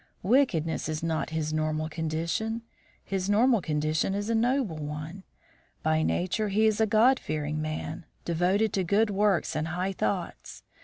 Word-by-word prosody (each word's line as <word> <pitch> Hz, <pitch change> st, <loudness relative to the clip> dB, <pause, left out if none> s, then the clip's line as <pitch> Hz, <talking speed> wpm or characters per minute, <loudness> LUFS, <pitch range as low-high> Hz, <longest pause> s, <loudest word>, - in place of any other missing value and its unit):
Wickedness 185 Hz, -, +2 dB
is 155 Hz, +1 st, -3 dB
not 165 Hz, -1 st, -1 dB
his 155 Hz, -1 st, -2 dB
normal 155 Hz, 0 st, -1 dB
condition. 165 Hz, +8 st, -2 dB, 0.4 s
His 195 Hz, 0 st, -2 dB
normal 230 Hz, +1 st, +4 dB
condition 155 Hz, +4 st, 0 dB
is 205 Hz, +3 st, -2 dB
a -, -, +2 dB
noble 230 Hz, -, +1 dB
one. 150 Hz, +5 st, -6 dB, 0.6 s
By 155 Hz, 0 st, +2 dB
nature 185 Hz, +6 st, 0 dB
he 215 Hz, +3 st, +3 dB
is 220 Hz, 0 st, +2 dB
a 220 Hz, -, +4 dB
God 235 Hz, +5 st, +4 dB
fearing 150 Hz, 0 st, -3 dB
man, 155 Hz, +1 st, -4 dB, 0.2 s
devoted 185 Hz, +6 st, +1 dB
to 190 Hz, -, +1 dB
good 205 Hz, +5 st, +2 dB
works 200 Hz, -2 st, +1 dB
and 155 Hz, +1 st, -1 dB
high 180 Hz, +4 st, -2 dB
thoughts. 105 Hz, -, -3 dB
175 Hz, 155 wpm, -28 LUFS, 155-215 Hz, 0.6 s, normal